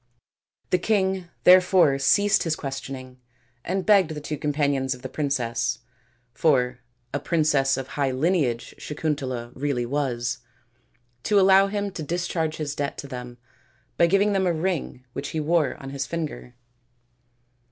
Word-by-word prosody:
The 180 - +3
king 190 -2 +1 0.2
there 185 +1 +8
fore 180 -7 +3
ceased 205 +9 +4
his 165 -2 0
questioning 135 -2 -7 0.4
and 190 +1 -2
begged 200 -5 +5
the - - -4
two 150 +1 -4
companions 140 -3 0
of 125 - -16
the 130 - -5
princess 120 -5 -1 0.6
for 125 -3 +2 0.3
a 145 - 0
princess 145 -4 +2
of 135 0 -5
high 140 -2 0
lineage 130 -3 0
Sakuntala 135 -6 -3
really 135 -3 -1
was 125 -3 -2 0.8
to 205 - +3
allow 195 0 +6
him 200 0 -2
to 170 - -6
dis 175 +3 -2
charge 160 -2 -1
his 150 -2 -3
debt 140 -1 -3
to 140 - -7
them 125 -2 -8 0.6
by 170 - +4
giving 200 +3 +3
them 190 -1 +1
a 175 - +2
ring 160 -6 -3
which 140 +1 -4
he - - +1
wore 155 -2 +1
on 135 0 -9
his 140 -1 -3
finger. 155 -7 -5
145 Hz, 150 wpm, -25 LUFS, 130-175 Hz, 0.8 s, there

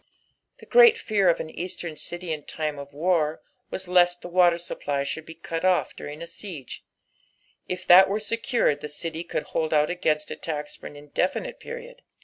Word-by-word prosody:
The - - -15
great 475 -2 +7
fear 205 - +2
of 170 - +2
au - - -4
Eastern 170 -1 -5
city 175 +2 -4
in 150 -2 -6
time 150 -2 -3
of 140 0 -9
war 155 0 0 0.3
was 190 - -4
lest 175 0 +3
the - - -5
water 175 -1 +4
supply 145 -4 -3
should 155 +3 -5
be 165 - -9
cut 165 0 -5
off 185 -1 +2
during 150 +3 -7
a - - -5
siege; 170 - -8 0.8
if 180 0 -4
that 185 +2 +8
were 205 +2 0
secured 230 - 0
the - - -4
city 165 +2 -4
could 170 - -3
hold 160 -1 -1
out 150 0 +3
agaiuat 155 -4 0
attacks 150 -2 -4
for - - -9
an - - -11
indeflnite 180 - -2
period. 485 +1 -9
170 Hz, 185 wpm, -25 LUFS, 155-185 Hz, 0.8 s, that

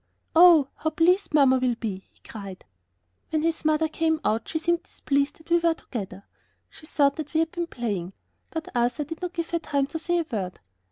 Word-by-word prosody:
"Oh, 330 -4 +8
how 315 - -1
pleased 350 +5 +2
mamma 275 -4 +5
will 250 -2 +1
be!" 200 -5 -5
he - - -30
cried. 200 -4 -9 0.6
When 315 -1 0
his 330 -1 0
mother 310 +1 +2
came 320 0 0
out 220 +1 0
she - - -1
seemed 340 +1 +1
displeased 280 0 -1
that 320 +1 -18
we 345 - +5
were 335 -1 +2
together. 195 -9 -7 0.5
She 310 - -13
thought 280 -2 +2
that 310 -1 -6
we - - +4
had 325 0 -1
been 345 -1 -3
playing, 200 - -4 0.4
but 320 -1 -5
Arthur 245 +4 +1
did 320 +4 -8
not 360 -1 -4
give 335 -1 -4
her 340 - +1
time 280 -3 0
to 320 +4 -5
say 345 +2 0
a 335 - 0
word. 190 -5 -3
310 Hz, 210 wpm, -25 LUFS, 245-330 Hz, 0.6 s, Oh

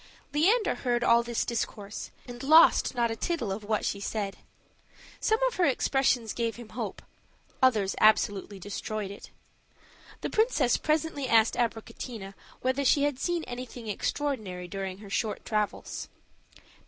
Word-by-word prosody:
Leander 400 +10 +3
heard 240 -1 -1
all 235 0 +5
this 235 -1 -2
discourse, 210 -3 -4 0.2
and 245 0 -8
lost 310 -1 +6
not 235 -1 +1
a - - -2
tittle 240 - -2
of 205 +2 -4
what 215 0 -1
she 200 - -1
said; 200 -1 -3 0.8
some 440 - +2
of - - -4
her 360 - +4
expressions 255 -4 +1
gave 230 -2 -1
him 235 -2 -10
hope, - - -5 0.6
others 215 -7 +3
absolutely 205 -2 +3
destroyed 205 +1 -4
it. 200 - -10 0.9
The - - -2
princess 435 - +3
presently 305 -3 0
asked 225 -1 +5
Abricotina 225 -3 -4 0.3
whether 260 +2 +1
she 280 +1 +4
had 290 -3 0
seen 345 +1 -1
anything 245 -2 -7
extraordinary 210 -5 -2
during 190 0 -5
her 205 0 -11
short 215 +1 -2
travels. 210 -2 -2
235 Hz, 140 wpm, -28 LUFS, 210-270 Hz, 0.9 s, lost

